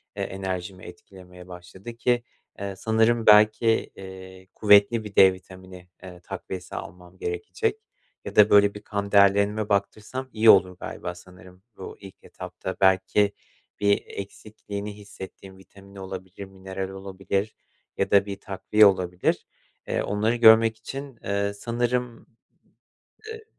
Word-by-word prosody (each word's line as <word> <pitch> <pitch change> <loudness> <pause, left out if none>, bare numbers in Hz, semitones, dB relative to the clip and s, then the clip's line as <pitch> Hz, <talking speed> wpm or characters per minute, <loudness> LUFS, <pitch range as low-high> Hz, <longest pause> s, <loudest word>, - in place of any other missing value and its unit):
e, - - -3
enerjimi 95 -1 -5
etkilemeye 90 0 -14
başladı 90 +5 -11
ki, 120 0 +1 0.4
eee, 100 -1 -5
sanırım 110 +2 +1
belki, 105 +2 +5 0.3
eee, 95 -1 -11
kuvvetli 105 +2 +4
bir 105 -1 -10
D 95 -1 +7
vitamini, 95 -1 -14 0.2
ııı, 90 -1 -12
takviyesi 90 +1 -8
almam 90 +1 -10
gerekecek 410 - -3 0.4
ya - - -7
da 105 0 +7
böyle 100 0 +5
bir 105 - -10
kan 100 -1 -4
değerlerime 100 +1 +3
baktırsam 110 +6 -2
iyi 110 0 +4
olur 90 -1 +5
galiba, 95 -5 -6
sanırım 90 +1 -16
bu 95 - -9
ilk 95 -1 -12
etapta. 95 - -8
Belki 95 +2 +3 0.5
bir 100 0 +2
eksikliğini 100 0 -8
hissettiğim 95 -1 -12
vitamin 100 +1 -18
olabilir, 95 0 -8
mineral 95 0 -7
olabilir 95 +2 -4 0.4
ya - - -1
da 100 -1 +5
bir 100 -1 -7
takviye 100 +2 +2
olabilir. 90 -2 +1 0.4
Eee, - - -1
onları 105 +4 0
görmek 115 -1 +6
için, 135 +2 -8
eee, 100 0 -1
sanırım, 120 +2 -3 1.1
eee, 445 0 -11
100 Hz, 130 wpm, -25 LUFS, 95-110 Hz, 1.1 s, D